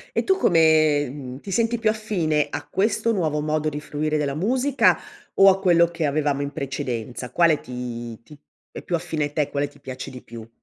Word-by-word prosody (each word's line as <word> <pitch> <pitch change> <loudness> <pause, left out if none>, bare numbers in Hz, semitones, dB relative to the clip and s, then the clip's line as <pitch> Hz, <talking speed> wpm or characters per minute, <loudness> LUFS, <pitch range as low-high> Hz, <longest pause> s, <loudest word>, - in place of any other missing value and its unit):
E - - +1
tu 385 -1 +3
come, 155 - +4
mhmm, 130 -2 -8
ti 195 - -9
senti 230 +4 +1
più 220 -1 +2
affine 175 -9 0
a - - -5
questo 215 +3 +1
nuovo 155 -7 0
modo 155 0 -1
di 150 0 -4
fruire 150 +1 -2
della 140 -2 -1
musica 255 - +2 0.4
o 195 0 +7
a 195 0 +1
quello 170 -3 +5
che 165 -2 -2
avevamo 145 -1 0
in 140 - -4
precedenza? 125 -3 -4
Quale 165 -3 +3
ti 120 -2 -7
ti 150 +3 -15 0.3
è - - -9
più 175 - -4
affine 160 -3 -3
a 145 - -6
te, 150 -2 0
quale 145 0 -1
ti 145 0 -21
piace 130 -1 -7
di 125 -1 -10
più? 115 -1 -11
155 Hz, 205 wpm, -23 LUFS, 140-180 Hz, 0.4 s, o